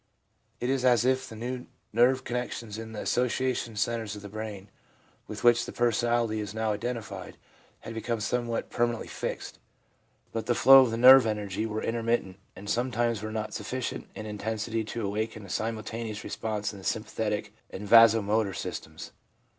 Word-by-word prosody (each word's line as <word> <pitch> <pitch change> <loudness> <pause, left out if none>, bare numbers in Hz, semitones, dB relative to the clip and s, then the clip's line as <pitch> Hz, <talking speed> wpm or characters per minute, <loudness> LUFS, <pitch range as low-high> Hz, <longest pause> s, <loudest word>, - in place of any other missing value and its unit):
It 125 +2 0
is 135 -2 0
as 125 -2 +4
if 130 0 +1
the 110 - -9
new 125 +3 -5 0.3
nerve 125 +3 +4
connections 120 -3 -4
in 110 0 -7
the 110 - -5
association 125 -1 0
centres 110 0 -1
of 105 - -10
the 100 - -8
brain, 105 -2 -7 0.6
with 105 -1 -7
which 120 0 +5
the - - -6
personality 120 -1 +1
is 105 0 -5
now 110 -1 0
identified, 105 -4 -5 0.4
had 115 - -7
become 115 +1 -2
somewhat 120 +1 -2
permanently 120 -1 0
fixed; - - -5 0.7
but 115 - -4
the 120 - +2
flow 135 +3 +9
of 115 -3 +1
nerve 130 0 +9
energy 105 0 -2
were 110 0 -3
intermittent, 115 -5 -1 0.2
and 100 - -10
sometimes 120 -1 0
were 110 0 -5
not 110 -1 -4
sufficient 125 +4 -4
in 110 - -6
intensity 110 +1 -3
to 115 0 -4
awaken 110 +1 -3
a - - -12
simultaneous 110 +1 -3
response 105 -2 -3
in 100 - -10
the - - -13
sympathetic 105 -1 -2 0.2
and 105 +2 -7
vaso 115 0 +7
motor 105 -1 +1
systems. 80 0 -6
110 Hz, 165 wpm, -28 LUFS, 105-120 Hz, 0.7 s, flow